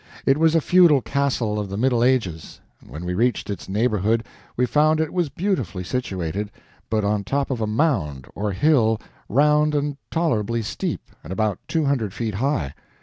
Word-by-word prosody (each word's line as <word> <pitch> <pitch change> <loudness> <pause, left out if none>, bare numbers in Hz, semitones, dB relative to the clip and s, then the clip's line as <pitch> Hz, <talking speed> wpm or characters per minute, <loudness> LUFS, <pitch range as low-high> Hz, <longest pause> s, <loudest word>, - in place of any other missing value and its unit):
It 135 +2 +3
was 160 0 +4
a 165 - +4
feudal 170 -6 +5
castle 130 -6 0
of 105 -2 -4
the 100 - -4
Middle 120 0 +2
Ages. 110 -11 0 0.2
When 75 +7 -8
we 90 - -2
reached 115 +2 0
its 100 - -7
neighborhood 110 +1 +1 0.3
we 125 - +3
found 150 +5 +3
it 160 -1 -1
was 175 -4 0
beautifully 130 - -2
situated, 100 -3 -3 0.4
but 110 -1 +1
on 100 0 0
top 140 +6 -1
of 120 -3 -2
a 110 - 0
mound, 105 - 0
or 105 0 -2
hill, 115 -1 +3 0.3
round 150 +4 +3
and 145 -1 -1
tolerably 115 -9 0
steep, - - -4
and 75 - -9
about 105 -1 0
two 160 -2 0
hundred 115 -8 0
feet 115 -3 -2
high. 100 - -1
115 Hz, 175 wpm, -23 LUFS, 100-145 Hz, 0.4 s, feudal